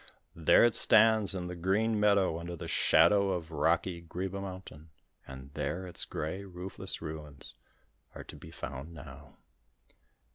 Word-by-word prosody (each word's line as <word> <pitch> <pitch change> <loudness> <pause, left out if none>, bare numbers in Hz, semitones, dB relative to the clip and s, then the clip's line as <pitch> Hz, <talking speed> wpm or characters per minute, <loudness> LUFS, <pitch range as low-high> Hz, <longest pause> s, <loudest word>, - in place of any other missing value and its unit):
There 85 +6 +5
it 120 - +2
stands 110 -3 +4
in 90 -1 -4
the 90 0 -6
green 105 +5 0
meadow 100 -5 +2
under 85 +1 -6
the - - -8
shadow 100 -1 +4
of 85 -2 -5
rocky 85 +3 0
Greeba 95 +3 -5
Mountain, 90 -5 -9 0.4
and 65 +1 -11
there 90 +6 -3
its 90 - -3
grey 80 +6 -5
roofless 90 -2 -5
ruins 75 -3 -9 0.6
are - - -8
to - - -11
be - - -12
found 80 0 -8
now. 75 - -12
90 Hz, 145 wpm, -30 LUFS, 80-100 Hz, 0.6 s, There